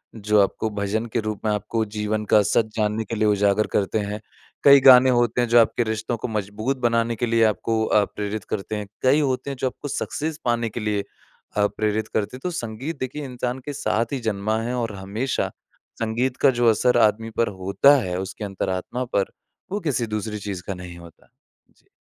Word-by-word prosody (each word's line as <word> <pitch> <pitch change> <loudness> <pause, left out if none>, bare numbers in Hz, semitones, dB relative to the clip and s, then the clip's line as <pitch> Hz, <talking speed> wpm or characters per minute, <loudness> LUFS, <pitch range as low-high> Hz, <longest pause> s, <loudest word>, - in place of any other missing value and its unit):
जो 105 -1 +2
आपको 110 +3 0
भजन 100 +3 -1
के 120 - +1
रूप 110 -1 -4
में 105 - +2
आपको 110 +2 -1
जीवन 105 0 -1
का 105 - +5
सच 110 - +2
जानने 105 +1 0
के 115 - -4
लिए 110 0 +2
उजागर 105 0 +2
करते 100 +2 +1
हैं। 105 +1 -4 0.4
कई 140 -1 +9
गाने 130 0 +8
होते 120 -1 +2
हैं 120 - +1
जो 120 0 +6
आपके 115 +1 +3
रिश्तों 110 +1 -2
को - - -4
मजबूत 110 +5 -2
बनाने 115 0 +1
के 120 - -1
लिए 115 -1 +2
आपको 110 +2 0
अ, 105 - +3
प्रेरित 105 0 -5
करते 105 +1 -3
हैं। 105 -1 -5
कई 130 +4 +4
होते 140 -1 -1
हैं 135 - -5
जो 130 - +1
आपको 145 - -6
सक्सेस 155 +3 -3
पाने 120 -1 +1
के 120 - -6
लिए 105 -2 -1 0.6
अ, 105 0 +4
प्रेरित 110 +1 -1
करते 105 +4 -2
हैं - - -15
तो 180 - -1
संगीत 130 +3 -5
देखिए, 140 +3 -4
इंसान 125 0 -3
के 145 - -4
साथ 110 +1 -1
ही 135 - -1
जन्मा 105 +2 -1
है 120 +2 -3
और 115 -3 -2
हमेशा 105 +7 -2 0.5
संगीत 120 +3 -1
का 140 - +5
जो 120 - +4
असर 120 +3 +3
आदमी 110 0 +2
पर 115 - +3
होता 140 +10 +5
है 90 -3 -3
उसकी 95 +3 -6
अंतरात्मा 95 +5 -3
पर, 100 -4 -1 0.4
वो 205 - -1
किसी 130 -7 -1
दूसरी 105 0 -3
चीज़ 95 -3 -5
का 95 - -2
नहीं 90 -1 -9
होता। 85 -2 -15 0.5
जी। - - -32
110 Hz, 205 wpm, -23 LUFS, 105-125 Hz, 0.6 s, कई